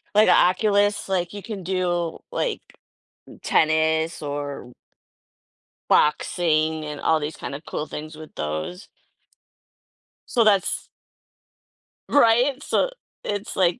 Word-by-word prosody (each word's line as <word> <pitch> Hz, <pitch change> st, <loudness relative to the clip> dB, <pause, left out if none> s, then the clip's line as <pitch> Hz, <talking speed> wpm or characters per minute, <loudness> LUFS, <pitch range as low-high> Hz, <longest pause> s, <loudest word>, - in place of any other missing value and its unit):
Like 215 Hz, -1 st, +6 dB
a -, -, +7 dB
Oculus, 205 Hz, +3 st, +3 dB
like, 180 Hz, -2 st, 0 dB
you 205 Hz, -, -6 dB
can 205 Hz, -5 st, -6 dB
do, 175 Hz, -2 st, -1 dB
like, -, -, -1 dB, 0.9 s
tennis 160 Hz, +1 st, +2 dB
or 145 Hz, -3 st, -5 dB, 1.2 s
boxing 155 Hz, 0 st, +2 dB
and 150 Hz, -1 st, -6 dB
all 160 Hz, -, +3 dB
these 150 Hz, +1 st, -5 dB
kinda 140 Hz, +2 st, -6 dB
cool 155 Hz, -, -4 dB
things 155 Hz, +1 st, -7 dB
with 155 Hz, 0 st, -12 dB
those. 80 Hz, -, -4 dB, 1.4 s
So 235 Hz, -, +3 dB
that's 200 Hz, -4 st, +2 dB, 1.2 s
Right? 255 Hz, +1 st, +4 dB
So -, -, +1 dB, 0.3 s
it's, 205 Hz, 0 st, -4 dB
like 180 Hz, +4 st, +2 dB
175 Hz, 110 wpm, -23 LUFS, 155-205 Hz, 1.4 s, a